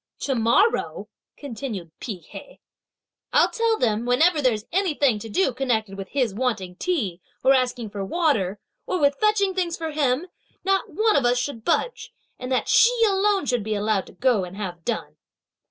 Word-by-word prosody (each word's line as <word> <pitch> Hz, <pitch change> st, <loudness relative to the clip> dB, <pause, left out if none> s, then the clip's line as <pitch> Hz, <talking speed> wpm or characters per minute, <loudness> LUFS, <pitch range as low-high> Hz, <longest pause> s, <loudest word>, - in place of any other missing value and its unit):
"To 275 Hz, -, 0 dB
morrow," 240 Hz, -, +1 dB, 0.3 s
continued 225 Hz, -, -6 dB
Pi 230 Hz, -, -4 dB
Hea, 195 Hz, -, -12 dB, 0.7 s
"I'll -, -, +4 dB
tell 455 Hz, -1 st, +1 dB
them 220 Hz, -, +1 dB
that 240 Hz, +2 st, -5 dB
whenever 310 Hz, +5 st, +4 dB
there's 225 Hz, -5 st, +1 dB
anything 295 Hz, -, +1 dB
to 225 Hz, -, -8 dB
do 265 Hz, -, +1 dB
connected 225 Hz, -6 st, -1 dB
with 195 Hz, 0 st, -7 dB
his 255 Hz, -7 st, 0 dB
wanting 210 Hz, -6 st, -2 dB
tea, 210 Hz, -, -2 dB, 0.2 s
or 265 Hz, +1 st, +6 dB
asking 245 Hz, -4 st, 0 dB
for 200 Hz, -1 st, -4 dB
water, 210 Hz, -, 0 dB, 0.3 s
or 365 Hz, -, -1 dB
with 285 Hz, -1 st, +2 dB
fetching 425 Hz, -2 st, +2 dB
things 355 Hz, -3 st, -1 dB
for 320 Hz, -1 st, -4 dB
him, 290 Hz, 0 st, +1 dB, 0.4 s
not 390 Hz, 0 st, +1 dB
one 435 Hz, 0 st, +2 dB
of 280 Hz, -, +3 dB
us 245 Hz, +1 st, +3 dB
should 245 Hz, -2 st, -3 dB
budge, 460 Hz, -, -1 dB, 0.3 s
and 255 Hz, +1 st, -6 dB
that 255 Hz, -, +1 dB
she 485 Hz, +1 st, +5 dB
alone 395 Hz, -2 st, +2 dB
should 245 Hz, -4 st, 0 dB
be 215 Hz, +1 st, -2 dB
allowed 205 Hz, -1 st, 0 dB
to -, -, -14 dB
go, 235 Hz, 0 st, +2 dB
and 180 Hz, +2 st, -8 dB
have 180 Hz, -5 st, -6 dB
done!" -, -, -4 dB
255 Hz, 180 wpm, -24 LUFS, 215-350 Hz, 0.7 s, or